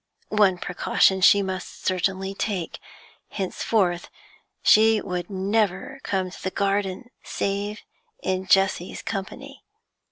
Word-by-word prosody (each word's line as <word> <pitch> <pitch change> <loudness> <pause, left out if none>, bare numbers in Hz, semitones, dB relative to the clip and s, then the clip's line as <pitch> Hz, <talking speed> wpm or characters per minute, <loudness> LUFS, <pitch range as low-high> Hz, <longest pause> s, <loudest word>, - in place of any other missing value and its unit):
One 205 -4 +3
precaution 185 +2 +2
she 200 +2 +6
must 185 -1 -6
certainly 190 +1 0
take; 195 -4 -3 0.5
henceforth 190 -2 -1 0.5
she 220 0 +6
would 180 -2 -4
never 195 0 -1
come 190 -2 -2
to - - -11
the 190 - -2
garden 200 +4 -1
save 200 +1 -3 0.4
in 190 0 -1
Jessie's 195 -2 +2
company. 255 +7 -6
195 Hz, 105 wpm, -24 LUFS, 185-205 Hz, 0.5 s, she